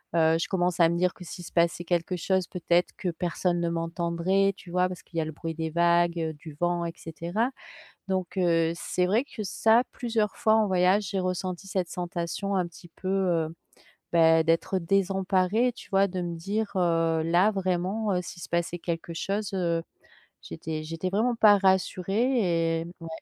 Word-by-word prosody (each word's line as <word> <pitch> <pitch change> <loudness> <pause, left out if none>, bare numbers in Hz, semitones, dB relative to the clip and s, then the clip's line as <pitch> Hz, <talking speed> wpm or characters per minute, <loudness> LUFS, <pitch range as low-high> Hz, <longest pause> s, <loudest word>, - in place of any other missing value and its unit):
heu, 160 0 +4
je - - -1
commence 180 -2 0
à 165 -1 +6
me 170 - 0
dire 180 +1 +1
que 180 - -11
s'il 175 +1 -8
se - - -10
passait 170 0 +1
quelque 175 +1 -1
chose 185 +1 0
peut-être 175 0 +1
que 180 - -2
personne 175 +1 -1
ne 170 - 0
m'entendrait, 170 +3 0
tu 180 - -14
vois? 180 0 +2
Parce 180 -2 -7
qu'il 165 - -10
y 165 - +3
a - - -2
le 155 - -5
bruit 165 +1 -6
des 160 -1 -3
vagues, 170 0 +3
heu, 160 -1 -2
du 150 0 -11
vent 175 0 0
et 165 - -4
cetera. 175 +9 -2 0.6
Donc, 185 -1 -2
heu, 165 -3 +2
c'est 180 +1 -1
vrai 215 +6 +2
que, 220 -6 -7
ça, 225 +5 +3
plusieurs 225 -3 -1
fois 220 - +3
en 220 - +3
voyage 185 +2 +3
j'ai 195 - -1
ressenti 185 +1 -3
cette 185 -3 -1
sensation 175 +3 -3
un 180 - +1
petit 175 0 -14
peu, 185 - -9
heu, 175 -4 +1 0.6
bah, 165 -1 +5
d'être 165 +3 +1
désemparée, 195 +5 +1
tu 240 - -14
vois? 195 0 +4
De 185 0 -4
me 170 -1 -3
dire: 205 +5 -2
«Heu, 165 -2 +2
là, 175 +5 +4
vraiment, 195 +2 -1
heu, 180 - +1
s'il 175 0 -9
se - - -7
passait 170 0 -1
quelque 170 0 -4
chose, 200 +4 -2
heu», 170 -3 0 0.6
j'étais 155 - -5
j'étais 165 +3 -3
vraiment 230 +5 +1
pas 210 -2 +7
rassurée. 190 -2 +1
Et 165 - -6
ouais, 165 - -7
180 Hz, 195 wpm, -27 LUFS, 170-195 Hz, 0.6 s, pas